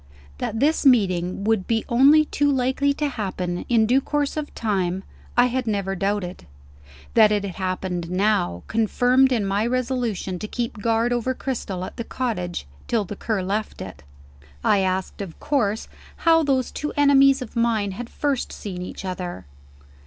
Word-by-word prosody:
That 220 - -2
this 300 +5 +2
meeting 190 -8 +3
would 215 -3 +1
be 225 -1 0
only 280 +6 +6
too 290 -1 +1
likely 265 +2 +1
to 295 - 0
happen, 185 -8 -3
in 230 -2 +4
due 255 +5 +3
course 290 0 -1
of 300 -1 -4
time, 190 -4 -1 0.3
I 245 - +7
had 250 0 -1
never 200 -2 -1
doubted. 195 -1 -2 0.7
That 215 -2 +6
it 205 -1 +1
had 190 - -6
happened, 185 -2 -3
now, 185 - +1
confirmed 245 +4 +3
me 250 - +2
in 205 - -1
my 200 +2 0
resolution 240 -7 -2
to 215 - -5
keep 230 -2 -4
guard 230 +2 +1
over 245 +2 -1
Cristel 200 -10 -4
at - - -10
the 235 - -3
cottage, 195 - -3 0.2
till 225 -4 +1
the 205 - -6
Cur 210 -2 -2
left 205 +3 -3
it. - - -8 0.6
I 205 - +4
asked, 190 +1 -1
of 185 -5 -7
course, 225 -8 0 0.4
how 325 0 +6
those 270 -4 +1
two 295 - -4
enemies 275 -2 +5
of 235 - -12
mine 225 -4 +1
had 235 +5 -7
first 280 -3 -1
seen 185 -4 -6
each 180 +1 -7
other. 180 - -5
220 Hz, 170 wpm, -23 LUFS, 190-255 Hz, 0.7 s, I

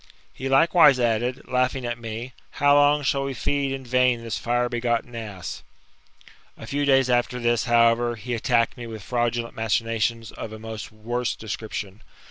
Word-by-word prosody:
He 135 +1 -5
likewise 145 0 +5
added, 120 +3 0
laughing 125 0 0
at 120 0 -3
me, 115 +2 -6 0.2
How 145 0 +4
long 145 +1 +4
shall 140 0 +1
we 135 -1 -4
feed 140 0 -1
in 135 -1 -5
vain 125 -1 +2
this 115 -1 -3
fire 120 +4 0
begotten 120 0 -1
ass? 105 -6 -6 1.0
A - - -9
few 145 +5 -1
days 135 -2 +4
after 125 0 +1
this, 120 -1 +1
however, 120 0 +3
he 120 +3 -5
attacked 115 0 +1
me 120 -1 -7
with 110 -3 -8
fraudu 120 -1 0
lent 115 - -11
machinations 115 0 -1
of 110 - -7
a - - -7
much 110 -1 -7
worse 120 +3 -3
description. 105 -2 -6
120 Hz, 170 wpm, -24 LUFS, 115-130 Hz, 1.0 s, likewise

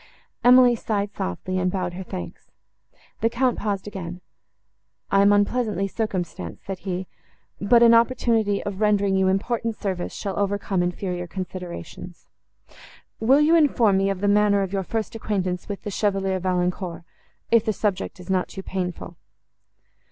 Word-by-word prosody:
Emily 250 0 +7
sighed 205 -2 -2
softly, 185 - -3
and 180 0 +1
bowed 180 -2 -2
her 185 - -6
thanks. 90 - -8 0.7
The 225 - +2
Count 245 +1 0
paused 200 -3 -2
again. 180 -3 -6 0.9
"I 195 - +5
am 200 +1 +5
unpleasantly 205 -1 +1
circumstanced," 190 -5 -4
said 195 -2 -5
he; 185 -1 -4 0.5
"but 235 +4 +5
an 235 0 +7
opportunity 230 -3 +2
of 200 0 -5
rendering 205 -2 +2
you 190 0 +3
important 225 +4 0
service 185 -4 -3
shall 195 -1 -4
overcome 200 -2 0
inferior 180 0 -3
considerations. 180 -1 -7 0.9
Will 265 +6 +4
you 310 +2 +4
inform 240 -11 +4
me 195 0 +2
of 195 -1 -3
the 205 - +1
manner 205 -1 +4
of 190 0 -5
your 195 - 0
first 220 +3 -3
acquaintance 190 -5 -3
with 200 - -5
the 205 - -4
Chevalier 195 -2 0
Valancourt, 180 -1 -2 0.5
if 230 -2 +5
the 220 - 0
subject 200 -2 -2
is 180 - -11
not 185 -1 +1
too 190 - -8
painful?" 180 -3 -5
195 Hz, 150 wpm, -24 LUFS, 185-215 Hz, 0.9 s, Emily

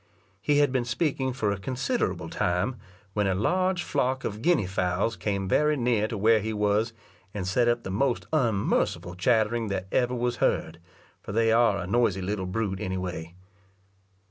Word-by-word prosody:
He 145 +4 +2
had 145 -2 +4
been 130 -2 +1
speaking 130 +2 -1
for 110 -5 -1
a 100 - -3
considerable 130 +5 -2
time, 90 +9 -1 0.4
when 105 -2 +1
a 95 - +1
large 185 - +1
flock 130 -2 -1
of 105 +1 -4
guinea 170 - +3
fowls 95 +4 0
came 100 -2 -2
very 150 +8 +2
near 120 -4 +1
to 110 - -4
where 110 +2 +4
he 110 +2 -3
was, 105 +2 +1 0.4
and 95 -3 -3
set 120 +5 +2
up 120 0 +1
the 95 - -5
most 120 +5 0
unmerciful 100 - +1
chattering 110 +4 +1
that 95 -2 -2
ever 125 0 +1
was 120 0 -1
heard, 80 +1 0 0.4
for 100 - -7
they 115 +1 +3
are 115 -3 +4
a 100 - -4
noisy 100 -1 +1
little 95 -1 -2
brute 95 -1 -2
any 95 0 -3
way. 90 -2 -5
110 Hz, 175 wpm, -27 LUFS, 95-125 Hz, 0.4 s, had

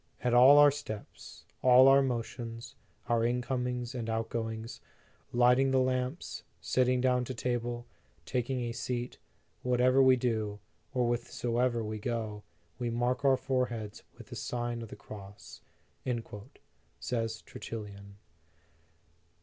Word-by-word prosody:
"At 125 -1 +1
all 130 +4 +8
our 145 0 +8
steps, 135 -7 -8 0.2
all 130 +1 +7
our 135 +1 +7
motions, 120 -1 -4 0.3
our 115 -1 +2
incomings 125 0 -1
and 115 -3 -4
outgoings, 115 0 -3 0.5
lighting 125 +2 +4
the 130 0 +3
lamps, 130 +3 -1 0.2
sitting 125 0 +1
down 125 -1 +2
to 130 - -5
table, 120 0 -2 0.4
taking 125 +4 -1
a 120 -1 -2
seat; 120 +1 -4 0.4
whatever 125 +1 +3
we 130 -1 +7
do, 110 -4 -1 0.3
or 125 -3 +1
whithersoever 120 0 0
we 110 0 -4
go, 110 -1 -3 0.4
we 120 -1 -1
mark 120 +3 0
our 135 -1 +5
foreheads 125 -5 -2 0.2
with - - -11
the - - -7
Sign 120 -1 -3
of 115 - -8
the - - -8
Cross," 100 -1 -11 1.4
says 115 -2 -3
Tertullian. 100 -3 -8
120 Hz, 125 wpm, -31 LUFS, 115-125 Hz, 1.4 s, all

